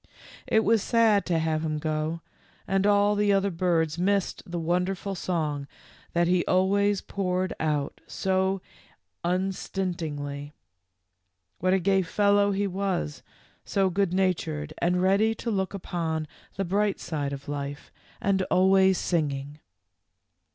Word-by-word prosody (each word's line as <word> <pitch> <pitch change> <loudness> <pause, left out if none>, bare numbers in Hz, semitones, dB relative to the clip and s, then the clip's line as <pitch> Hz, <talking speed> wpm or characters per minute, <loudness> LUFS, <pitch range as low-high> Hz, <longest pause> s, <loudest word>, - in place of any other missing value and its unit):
It 220 - +3
was 225 -1 +3
sad 225 -2 +3
to 170 -2 +2
have 160 -1 0
him 155 -1 -1
go, 155 +2 -2 0.5
and 195 +1 +2
all 205 0 +4
the 205 0 +2
other 195 0 +2
birds 165 -2 0
missed 195 +1 +1
the 175 - -3
wonder 180 +3 0
ful 195 +2 -5
song 155 -6 -2 0.5
that 170 0 +3
he 180 0 +3
always 200 +2 +2
poured 185 -1 -2
out 150 -2 -1
so 190 0 0 0.6
un 185 +2 +1
stintingly. 150 -7 -4 1.1
What 185 +2 +2
a 190 - +3
gay 195 +1 +3
fellow 200 +3 +3
he 200 0 0
was, 190 - -2 0.4
so 195 -2 +1
good 195 0 +1
natured 160 -5 -1
and 180 +1 +1
ready 205 +4 +3
to 230 - -3
look 190 -1 -1
upon 160 -4 -3 0.3
the 195 - -1
bright 200 +2 +1
side 145 -4 -3
of 140 0 -7
life, 145 0 -5 0.3
and 195 -1 +1
always 190 0 +4
singing. 145 -3 -2
185 Hz, 135 wpm, -27 LUFS, 160-195 Hz, 1.1 s, all